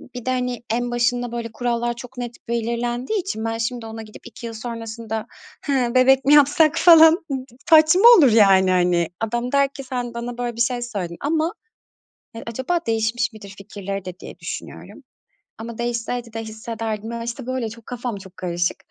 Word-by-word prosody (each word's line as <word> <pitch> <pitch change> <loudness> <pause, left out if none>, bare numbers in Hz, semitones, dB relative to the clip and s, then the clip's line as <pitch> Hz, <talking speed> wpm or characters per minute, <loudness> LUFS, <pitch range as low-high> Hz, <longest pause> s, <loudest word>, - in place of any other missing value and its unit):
Bir 245 - -7
de, - - -1
hani, 250 -1 -2
en 240 +2 -1
başında 240 0 0
böyle 235 -1 -5
kurallar 240 0 -1
çok 250 +2 -11
net 240 -1 -5
belirlendiği 240 - -2
için 225 - -4
ben 225 0 -2
şimdi 230 +1 -3
ona 225 0 -7
gidip 215 -1 -12
2 235 - -10
yıl 230 - -5
sonrasında, 225 -1 -5 0.4
"Hıı, 255 -4 0
bebek 260 +1 +5
mi 285 - +5
yapsak?" 300 +2 +5
falan 325 -2 +8 0.2
ı 275 - 0
d 260 - -8 0.2
saçma 315 +4 +6
olur, 280 - +6
yani, 195 -4 +5
hani. 175 -2 +2
Adam 240 +2 -2
der 280 0 +3
ki 275 - -8
"Sen 245 -2 -4
bana 235 +1 -5
böyle 240 -1 -3
bir 235 - -2
şey 245 0 0
söyledin 195 -8 -5
ama" 320 +4 0 0.8
Eee, 230 - -8
acaba 260 +9 -1
değişmiş 225 +1 0
midir 215 -2 -11
fikirleri 195 -1 -6
de 185 0 -8
diye - - -10
düşünüyorum. - - -8 0.5
Ama 230 0 -8
değişseydi 235 0 -3
de 225 0 -4
hissederdim. 220 0 -5
Ya, 235 0 -4
işte, 235 +2 -6
böyle 255 -3 -2
çok 230 0 -13
kafam 245 -3 -4
çok 190 -1 -13
karışık. 175 -1 -1
235 Hz, 185 wpm, -22 LUFS, 220-250 Hz, 0.8 s, falan